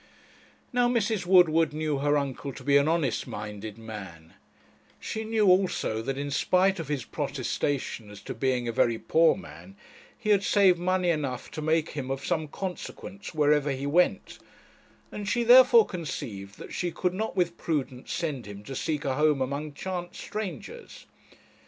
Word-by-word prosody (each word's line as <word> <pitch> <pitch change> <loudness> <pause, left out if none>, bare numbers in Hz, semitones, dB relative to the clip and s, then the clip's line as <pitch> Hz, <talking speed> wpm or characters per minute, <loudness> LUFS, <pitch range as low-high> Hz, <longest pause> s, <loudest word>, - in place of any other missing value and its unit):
Now 245 0 +3
Mrs. 220 -5 0
Woodward 165 -4 +5
knew 155 -2 -1
her 145 +1 +2
uncle 140 0 -3
to - - -10
be 140 0 +3
an 140 +1 +5
honest 160 -7 0
minded 105 0 -7
man; 95 -8 -9 0.7
she 220 - -4
knew 220 -1 +1
also, 185 - +2
that, 135 +3 -3
in 140 0 -3
spite 185 +6 +2
of 165 - -5
his 140 -4 -2
protestation 125 -6 -3
as 105 -1 -11
to - - -6
being 130 -2 0
a - - 0
very 115 0 +2
poor 165 +7 +3
man, 195 0 -12 0.4
he 215 -3 -1
had 200 -1 +4
saved 190 -4 +4
money 180 0 +1
enough 140 -6 -3
to 155 - -5
make 155 +1 +1
him 135 -3 -5
of 135 0 -3
some 160 -1 -1
consequence 185 +2 -7
wherever 150 -1 +3
he 135 0 -3
went; 170 +6 +1 0.7
and 205 -2 -5
she 240 +1 +1
therefore 255 - +8
conceived 105 - -6
that - - -10
she 175 - -1
could 180 +2 -1
not 220 +4 -3
with 175 -2 +1
prudence 135 -5 -3
send 150 -9 -3
him 100 0 -9
to 135 +4 -7
seek 150 +2 -2
a 135 - +1
home 150 -2 +3
among 140 +3 -3
chance 175 +3 -5
strangers. 195 - -7
155 Hz, 170 wpm, -27 LUFS, 135-185 Hz, 0.7 s, therefore